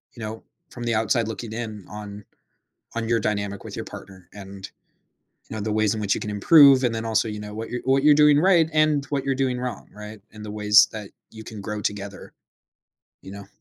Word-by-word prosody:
you 115 - -11
know, 110 +1 -7 0.3
from 120 - -8
the 115 -2 0
outside 110 +1 +1
looking 110 0 -6
in 110 -4 -6
on 105 0 -9 0.7
on 115 -1 -3
your 115 -1 +1
dynamic 100 -2 -3
with - - -9
your - - -5
partner. 95 -2 -12
And, 100 -1 -10 0.8
you 110 - -7
know, 105 - -4
the 110 0 -2
ways 110 -1 +1
in 110 - -4
which 100 -2 +1
you - - -4
can 105 - -5
improve 135 +4 +6
and 115 -2 +1
then 115 0 -4
also, 110 -1 0
you 105 0 -6
know, 105 0 -8
what 110 +1 -6
you're 125 - -4
what 135 +1 +2
you're 150 - +7
doing 150 -1 +5
right 175 -3 +4
and 155 -2 +2
what 140 -1 -3
you're 135 -1 0
doing 130 -2 -1
wrong, 125 -5 -6
right, 105 0 -10
and 105 -1 -11
the 105 - -7
ways 105 -1 +5
that 105 -2 -8 0.2
you 110 -1 -11
can 110 -3 -9
grow 105 +1 -5
together, 100 -1 -5 0.9
you 95 - -11
know? 100 -1 -10
110 Hz, 225 wpm, -23 LUFS, 105-125 Hz, 0.9 s, you're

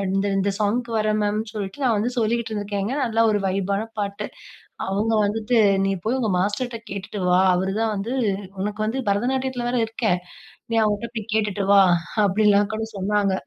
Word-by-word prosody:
இந்த 195 +1 +1
இந்த 195 +1 +1
சாங்குக்கு 230 +3 0
வரேன் 215 0 +1
மேம்ன்னு" 210 +1 -1
சொல்லிட்டு 210 +6 -5
நான் 240 -4 +3
வந்து 215 +4 0
சொல்லிக்கிட்டு 230 0 0
இருந்திருக்கேங்க, 205 +3 -2
அதுல 230 -1 +2
ஒரு 205 -1 +1
வைப்பான 195 +3 -1
பாட்டு. 200 -1 -3 0.6
அவுங்க 210 +4 0
வந்துட்டு, 225 +3 0 0.3
"நீ - - +1 0.2
போயி 250 +4 +1
உங்க 220 -4 0
மாஸ்டர்ட்ட 225 +5 -1
கேட்டுட்டு 200 0 -5
வா, 180 +1 +5
அவருதான் 200 +4 0
வந்து 225 +6 -3 0.5
உனக்கு 210 +1 -3
வந்து 245 +5 -1
பரதநாட்டியத்துல 250 +3 -1
வேற 250 - 0
இருக்கே. 225 -2 -1 0.6
நீ - - +2
அவுங்கிட்ட 215 +2 -1
போயி 215 - -4
கேட்டுட்டு 210 -2 0
வா." 200 -1 +8 0.4
அப்டிலாம் 205 +1 +3
கூட 220 - -2
சொன்னாங்க. 200 0 +1
210 Hz, 165 wpm, -23 LUFS, 200-225 Hz, 0.6 s, வா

